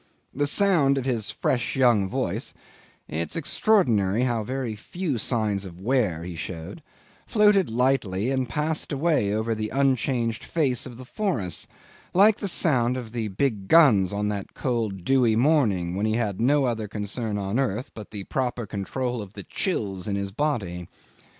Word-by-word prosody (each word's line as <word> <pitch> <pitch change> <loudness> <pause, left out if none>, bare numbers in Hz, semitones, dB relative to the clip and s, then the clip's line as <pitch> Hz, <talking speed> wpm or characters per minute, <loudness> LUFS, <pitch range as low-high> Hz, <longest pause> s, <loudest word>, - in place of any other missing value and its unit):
The 145 +2 0
sound 155 -6 +3
of 130 - -2
his 115 -5 -1
fresh 120 -2 -1
young 120 -7 +3
voice - - -3 0.5
it's 80 +2 -3
extraordinary 125 - +2
how 120 -3 0
very 125 -1 -3
few 150 - -3
signs 105 -3 0
of 90 -2 -9
wear 105 -7 0
he 90 0 -6
showed 85 - -7 0.5
floated 210 - +4
lightly, 120 -3 +1
and 130 -2 -1
passed 150 +4 -2
away 145 -8 +1
over 110 +2 0
the 110 -1 -3
unchanged 130 -4 0
face 135 -8 0
of 120 -2 -10
the 130 - -10
forests 125 - -2 0.5
like 205 +3 +6
the 200 - -3
sound 130 -9 +2
of 120 -4 -7
the 115 -2 -2
big 105 -1 -1
guns 110 - +6
on 105 +1 -1
that 100 -2 -5
cold 110 -8 -2
dewy 125 -5 +3
morning 110 - +2
when 105 +3 0
he 110 - +1
had 110 -4 -1
no 140 +3 +3
other 115 -3 -2
concern 105 +1 -3
on 100 +4 -1
earth 125 -2 -1
but 105 -2 -9
the 105 -2 -6
proper 125 +1 -2
control 115 +4 -3
of 100 -1 -10
the 100 - -8
chills 100 - -2
in 100 - -1
his 100 0 -3
body. 95 - -2
115 Hz, 165 wpm, -25 LUFS, 100-135 Hz, 0.5 s, like